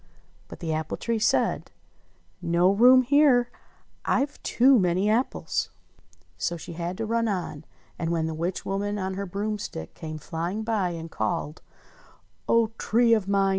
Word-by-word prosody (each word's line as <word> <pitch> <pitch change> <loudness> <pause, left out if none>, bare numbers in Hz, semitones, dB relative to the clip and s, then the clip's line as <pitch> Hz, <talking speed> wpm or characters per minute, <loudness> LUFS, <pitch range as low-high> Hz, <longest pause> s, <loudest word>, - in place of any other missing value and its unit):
But - - -11
the 160 -2 -2
apple 155 0 -3
tree 230 -1 -1
said: 215 - +1 0.7
"No 175 +2 +3
room 250 +5 +6
here! 270 -2 +4 0.5
I've 280 +3 0
too 255 +1 +4
many 185 +2 +1
apples." 240 +4 -1 0.7
So 170 - -1
she 170 - -9
had 175 +2 -4
to 225 - -2
run 230 +1 0
on; 175 -6 -3 0.3
and 165 -2 -1
when 165 -1 0
the 160 - -3
witch 170 +4 -3
woman 205 +1 -2
on 190 -1 -3
her 200 +1 -4
broomstick 205 - -4
came 155 -1 -7
flying 170 +7 -4
by 215 -5 0
and 165 -1 -7
called: 145 +8 -3 0.9
"O 230 -1 +3
Tree 230 +1 +3
of 215 -4 +1
mine 195 -1 +2
195 Hz, 155 wpm, -26 LUFS, 170-230 Hz, 0.9 s, room